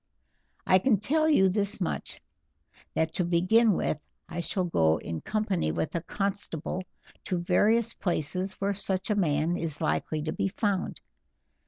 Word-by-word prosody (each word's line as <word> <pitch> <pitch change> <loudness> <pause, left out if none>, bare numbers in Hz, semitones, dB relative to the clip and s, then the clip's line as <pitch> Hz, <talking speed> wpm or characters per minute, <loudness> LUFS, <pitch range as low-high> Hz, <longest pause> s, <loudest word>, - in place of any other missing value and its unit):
"I 185 - +5
can 215 -1 +3
tell 310 +8 +2
you 190 -11 +5
this 200 +2 0
much, 180 - -3 0.8
that 160 0 0
to 180 - 0
begin 185 +6 +4
with 155 - -1 0.3
I - - -5
shall 185 +2 -1
go 80 - +2
in 80 -2 -5
company 205 - -1
with 80 +1 -2
a 170 - -1
constable 190 -2 -3 0.4
to 185 - -1
various 205 +6 +2
places 180 +2 -1
where 200 +1 -1
such 190 0 -1
a - - +2
man 165 -2 +1
is 160 -3 +1
likely 155 -1 -1
to 155 0 -2
be - - 0
found. 200 -1 -2
185 Hz, 155 wpm, -28 LUFS, 165-205 Hz, 0.8 s, I